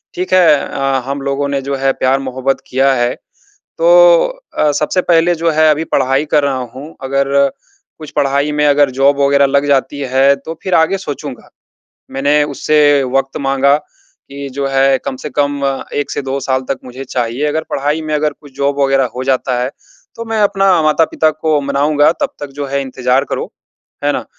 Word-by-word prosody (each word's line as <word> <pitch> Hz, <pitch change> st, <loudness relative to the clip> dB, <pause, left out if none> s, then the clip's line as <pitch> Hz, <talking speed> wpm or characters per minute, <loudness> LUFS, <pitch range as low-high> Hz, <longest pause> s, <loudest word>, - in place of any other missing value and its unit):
ठीक 185 Hz, +1 st, -3 dB
है 185 Hz, -2 st, +5 dB, 0.2 s
अ, 135 Hz, -1 st, -1 dB
हम 140 Hz, 0 st, -4 dB
लोगों 140 Hz, +1 st, -2 dB
ने 140 Hz, -1 st, -1 dB
जो 140 Hz, 0 st, -3 dB
है, 135 Hz, 0 st, +1 dB
प्यार-मोहब्बत 130 Hz, 0 st, -1 dB
किया 135 Hz, +1 st, +2 dB
है, 120 Hz, 0 st, 0 dB, 0.4 s
तो -, -, +4 dB, 0.3 s
अ, 150 Hz, -, +3 dB
सबसे 150 Hz, +5 st, 0 dB
पहले 170 Hz, +1 st, +4 dB
जो 165 Hz, 0 st, 0 dB
है, 155 Hz, 0 st, +3 dB
अभी 155 Hz, +2 st, 0 dB
पढ़ाई 135 Hz, +2 st, +1 dB
कर 150 Hz, -, +4 dB
रहा 135 Hz, -2 st, 0 dB, 0.2 s
हूँ, 145 Hz, +5 st, -10 dB
अगर 135 Hz, +1 st, 0 dB, 0.7 s
कुछ 155 Hz, -2 st, -10 dB
पढ़ाई 140 Hz, +2 st, +1 dB
में 150 Hz, 0 st, +1 dB
अगर 145 Hz, -1 st, +3 dB
जॉब 140 Hz, +1 st, +3 dB
वग़ैरह 140 Hz, 0 st, +4 dB
लग 140 Hz, +1 st, +1 dB
जाती 140 Hz, 0 st, 0 dB
है, 135 Hz, +1 st, +5 dB
तो 160 Hz, +4 st, -8 dB
फिर 185 Hz, -2 st, -1 dB
आगे 165 Hz, +4 st, +2 dB
सोचूँगा।" 145 Hz, -7 st, -7 dB, 0.6 s
मैंने 145 Hz, +2 st, +1 dB
उससे 145 Hz, -2 st, +3 dB
वक़्त 135 Hz, +2 st, -1 dB
माँगा 140 Hz, +1 st, +3 dB
कि, 140 Hz, -1 st, -12 dB
"जो 140 Hz, +1 st, -3 dB
है, 135 Hz, 0 st, +2 dB
कम 130 Hz, -, -4 dB
से -, -, -4 dB
कम 145 Hz, +1 st, -1 dB, 0.3 s
1 145 Hz, -, -2 dB
से -, -, -3 dB
2 135 Hz, +1 st, -3 dB
साल 130 Hz, 0 st, -1 dB
तक 135 Hz, -, -1 dB
मुझे 130 Hz, +2 st, -8 dB
चाहिए, 125 Hz, +3 st, -2 dB
अगर 160 Hz, +2 st, -2 dB
पढ़ाई 145 Hz, +3 st, -1 dB
में 155 Hz, -1 st, -3 dB
अगर 150 Hz, 0 st, 0 dB
कुछ 145 Hz, -3 st, -17 dB
जॉब 140 Hz, 0 st, -1 dB
वग़ैरह 135 Hz, -1 st, +2 dB
हो 130 Hz, -, -3 dB
जाता 130 Hz, -2 st, 0 dB
है, 130 Hz, -, -2 dB, 0.5 s
तो 230 Hz, -, -6 dB
मैं 225 Hz, -1 st, -1 dB
अपना 195 Hz, -3 st, +3 dB
माता-पिता 155 Hz, 0 st, +2 dB
को 155 Hz, -1 st, 0 dB
मनाऊँगा, 145 Hz, +2 st, +2 dB
तब -, -, -1 dB
तक 145 Hz, -, -4 dB
जो 140 Hz, -, -2 dB
है, 140 Hz, +1 st, -2 dB
इंतज़ार 130 Hz, 0 st, 0 dB
करो।" -, -, -5 dB, 0.5 s
है -, -, +2 dB
ना? -, -, -3 dB
140 Hz, 190 wpm, -15 LUFS, 135-155 Hz, 0.7 s, है